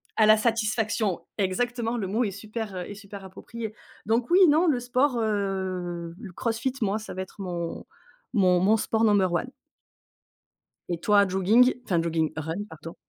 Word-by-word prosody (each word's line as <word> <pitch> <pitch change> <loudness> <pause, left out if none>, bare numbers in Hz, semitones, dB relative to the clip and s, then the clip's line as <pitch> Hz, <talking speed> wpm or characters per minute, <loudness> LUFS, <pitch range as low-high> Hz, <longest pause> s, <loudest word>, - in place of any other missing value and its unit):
À 215 - +4
la 215 0 +7
satisfaction, 215 -3 0 0.2
exactement, 235 +4 -1
le 210 - -2
mot 215 +6 0
est 210 - 0
super, 210 +1 -6
heu, 180 - -3
est - - -7
super 200 -1 -10
approprié. 220 +3 -7 0.3
Donc 230 +3 +1
oui, 365 +1 +7
non, 315 +4 +4
le 280 -6 +2
sport, 250 +2 +1
heu, 190 -5 -2
le 210 -5 -9
CrossFit, 230 +6 -2
moi, 210 +1 0
ça 215 - -8
va 190 - -3
être 190 - -16
mon 175 -3 -4 0.5
mon 185 -5 +4
mon 205 +5 +4
sport 220 +1 0
number 200 -4 +3
one. 240 +9 -1 1.4
Et 170 -2 -2
toi, 205 +1 +4
jogging? 205 +7 +4
Enfin 175 -3 +1
jogging, 165 -1 0
run, 160 +6 -3
pardon. 160 +1 -9
205 Hz, 170 wpm, -26 LUFS, 185-230 Hz, 1.4 s, la